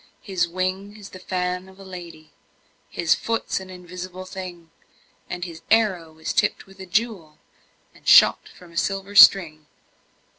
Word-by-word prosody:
His 185 -3 -1
wing 185 +4 -3
is 205 -2 -11
the 185 - -11
fan 180 0 -3
of 190 +1 -18
a - - -11
lady, 175 -4 -11 0.6
His 170 -2 +1
foot's 230 -3 -2
an 190 0 -11
invisible 180 0 -9
thing, 180 -3 -9 0.6
And 180 0 -4
his 165 -2 -10
arrow 185 -8 +1
is 160 - -4
tipped 210 - 0
with 195 -1 -19
a 190 - -9
jewel, 185 -6 -2 0.6
And - - -19
shot - - +6
from 180 -1 -16
a 170 - -11
silver 195 +1 -2
string. 160 -7 +6
185 Hz, 155 wpm, -23 LUFS, 170-195 Hz, 0.6 s, shot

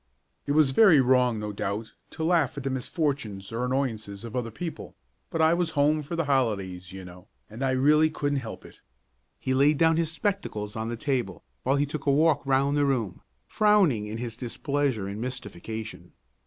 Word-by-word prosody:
It 145 - +1
was 150 -3 +4
very 170 0 +6
wrong, 125 -2 +3
no 105 0 -4
doubt, 100 +2 -4 0.2
to 160 - -6
laugh 160 -5 +2
at 140 - -4
the 135 - -1
misfortunes 130 - -3
or 115 +2 -2
annoyances 115 -6 -2
of 115 - -8
other 120 -2 -2
people, 165 +8 -7 0.3
but 165 -1 0
I 160 +1 +5
was 175 -1 0
home 150 +2 +3
for 150 +4 -5
the 165 -1 0
holidays, 100 -10 -1
you 95 -1 -9
know, 90 +2 -13 0.2
and 110 +4 -9
I 135 - +1
really 150 +4 +4
couldn't 145 -2 -1
help 115 -4 -8
it. - - -15 0.6
He 130 - -2
laid 140 +3 +4
down 160 +1 +4
his 165 -1 +1
spectacles 165 - -3
on 110 0 -3
the 120 - -4
table, 130 -1 -2 0.2
while 135 +2 +1
he 145 +1 +2
took 145 0 -6
a - - +5
walk 150 +1 +3
round 140 +1 +2
the 145 - +3
room, 120 -9 -1 0.2
frowning 190 - +3
in 110 +1 -5
his 115 -1 -5
displeasure 130 -3 -2
and 100 +2 -5
mystification. 110 -3 -6
130 Hz, 195 wpm, -27 LUFS, 110-150 Hz, 0.6 s, very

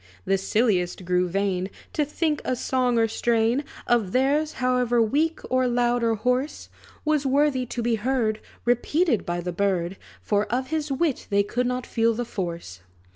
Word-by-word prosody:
The 195 - +2
silliest 190 -4 0
grew 180 0 +2
vain, 190 0 -1 0.2
To 305 - +1
think 300 +1 -1
a 255 - 0
song 250 -1 0
or 225 0 +4
strain 230 +3 +1 0.2
Of 225 -6 +1
theirs, 285 +4 +2
however 250 -2 +1
weak, 295 +9 +1
or 255 0 +2
loud, 240 0 +1
or 230 -1 +2
hoarse, 250 +6 -1 0.4
Was 305 -2 +2
worthy 270 -2 +2
to 240 0 -4
be 235 0 +1
heard 220 -2 0 0.3
Repeated 245 - +1
by 175 0 -1
the 180 0 -4
bird; 190 -1 0 0.2
For 205 0 0
of 255 +2 -1
his 310 -2 -1
wit 280 0 0
they 200 -1 +3
could 245 +4 -1
not 250 0 -2
feel 230 -1 +1
the 240 +1 -2
force. 170 - -5
240 Hz, 170 wpm, -25 LUFS, 200-260 Hz, 0.4 s, or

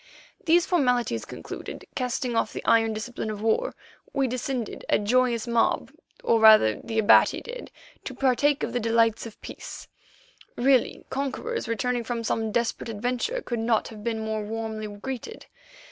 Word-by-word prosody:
These 340 +1 +4
formalities 250 - +1
concluded, - - -8
casting 250 -1 -2
off 225 - +1
the - - -6
iron 225 -1 +4
discipline 220 +1 -4
of 210 0 -5
war, 350 - +1 0.4
we 275 -1 +1
descended 250 -1 -3
a - - +4
joyous 235 +2 +2
mob, 235 -1 +1 0.3
or 230 - +3
rather 215 - +6
the 225 - -4
Abati 220 0 +5
did, - - -8 0.4
to - - -5
partake 275 +2 +2
of - - -2
the 245 - +1
delights 230 0 +2
of 220 - -13
peace. - - -9 0.7
Really, 260 0 +2
conquerors 280 - -3
returning 240 +2 -1
from 230 0 -3
some 220 0 -1
desperate 235 +1 -1
adventure 250 - -2
could 240 -2 -3
not 225 -1 +1
have 215 -2 -10
been 220 -1 -2
more 220 0 -2
warmly 220 0 -4
greeted. 260 - -7
235 Hz, 155 wpm, -26 LUFS, 220-255 Hz, 0.7 s, rather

